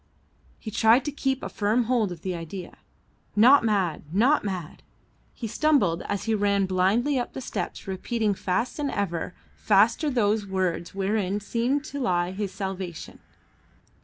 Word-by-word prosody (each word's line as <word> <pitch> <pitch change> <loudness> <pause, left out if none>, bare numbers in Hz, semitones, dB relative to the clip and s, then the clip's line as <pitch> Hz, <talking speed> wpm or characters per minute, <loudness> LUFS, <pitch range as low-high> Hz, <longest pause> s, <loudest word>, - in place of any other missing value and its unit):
He 215 - -7
tried 225 +4 +4
to 295 - -1
keep 270 -2 -2
a - - -2
firm 215 +4 +1
hold 230 -4 +1
of 170 -2 -9
the 185 - -2
idea. 170 +2 -7 0.6
Not 250 +6 +7
mad, 195 -7 0
not 245 - +3
mad. 185 -6 -5 0.5
He 235 - -6
stumbled 220 - +2
as 200 -1 -2
he 225 - 0
ran 200 -2 +2
blindly 200 +9 +2
up 245 - -4
the - - -5
steps 260 - -5
repeating 210 +3 -1
fast 190 +9 -2
and 290 -1 -1
ever 180 -5 -3 0.2
faster 220 +9 +3
those 215 -5 +1
words 185 -2 -2
wherein 195 0 0
seemed 240 +7 -1
to 285 -1 -6
lie 175 -8 0
his 195 0 -4
salvation. 190 -4 -6
205 Hz, 155 wpm, -26 LUFS, 185-240 Hz, 0.6 s, Not